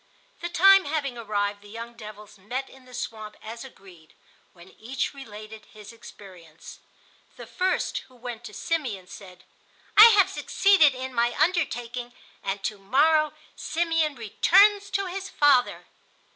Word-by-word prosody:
The 345 - -5
time 390 +2 +6
having 285 -4 -3
arrived, 205 -3 -3
the 205 - -16
young 230 +2 -8
devils 210 -2 -12
met 250 +7 -5
in 265 -1 -18
the 250 - -16
swamp 215 -3 -7
as 230 +3 -9
agreed, 185 -10 -16 0.4
when 175 +1 -17
each 250 +6 -4
related 215 -5 -11
his 210 0 -12
experience. 180 -8 -14 0.6
The - - -9
first, 370 0 -1
who 260 - -22
went 240 -1 -8
to 210 - -10
Simeon, 250 - -3
said: 180 -1 -13 0.5
"I 425 - +11
have 385 -1 +4
succeeded 390 -8 +3
in 260 0 -6
my 235 0 0
undertaking, 245 -8 -1 0.3
and 195 0 -4
to 210 - -3
morrow 305 +9 +2 0.2
Simeon 325 -3 -1
returns 395 - +3
to 395 0 -1
his 385 +1 -6
father." 280 -7 +2
245 Hz, 145 wpm, -25 LUFS, 210-315 Hz, 0.6 s, I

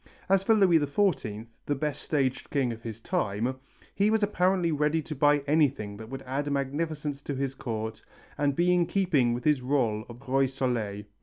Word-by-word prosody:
As 195 -1 +4
for 220 +3 +3
Louis 185 -6 +5
XIV, 140 - 0 0.2
the 145 - +1
best 150 +1 -3
staged 135 -4 -1
king 135 -4 +1
of 115 - -11
his 115 -1 -7
time, 115 +4 -1 0.3
he 200 +1 +2
was 220 -1 +2
apparently 185 -3 +2
ready 150 +1 +1
to 155 - -5
buy 145 +1 +3
anything 140 -9 +1
that 110 +1 -9
would 135 +1 -6
add 140 +3 -2
magnificence 145 +1 -2
to 140 - -4
his 135 0 -2
court 110 -3 -5 0.3
and 145 -1 +1
be 175 +3 +3
in 175 -1 +2
keeping 150 -12 +2
with 120 - -5
his 150 -4 +3
rôle 125 -5 0
of 120 0 -10
Roi 135 +1 +3
Soleil. 120 -6 -2
140 Hz, 185 wpm, -28 LUFS, 120-155 Hz, 0.3 s, Louis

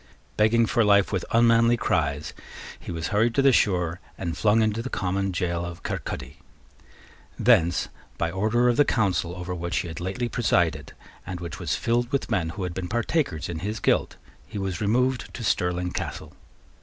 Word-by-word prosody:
Begging 115 +2 +4
for 115 +1 +2
life 100 -2 +4
with 95 -4 -1
unmanly 115 0 +4
cries, 75 -8 -1 0.5
he - - -7
was 80 -1 -3
hurried 110 +3 +2
to 140 - +3
the 135 - +6
shore 90 -7 +1 0.2
and 85 -1 -3
flung 110 +1 +3
into 110 +1 0
the 130 - -5
common 95 -1 -1
gaol 85 -1 -1
of 85 -1 -7
Kirkaldy. 65 +5 -5 1.0
Thence, 90 -8 +3 0.3
by 85 0 -1
order 110 +6 +2
of 120 - +2
the 145 - +7
Council 95 -8 0
over 90 0 -5
which 85 0 -3
he - - -1
had 80 - -7
lately 95 +8 -2
presided, 90 -9 0 0.3
and 90 -1 -6
which 85 +1 -6
was 80 -6 -1
filled 120 - 0
with 140 -3 -1
men 90 -6 +1
who 95 +4 -5
had 90 -1 -3
been 90 0 -4
partakers 120 - -1
in 85 -2 -4
his 105 +5 -3
guilt, - - +1 0.3
he - - -7
was 95 -2 -3
removed 125 +3 +1
to 120 - -6
Stirling 90 -2 0
Castle. - - -5
95 Hz, 180 wpm, -25 LUFS, 85-115 Hz, 1.0 s, the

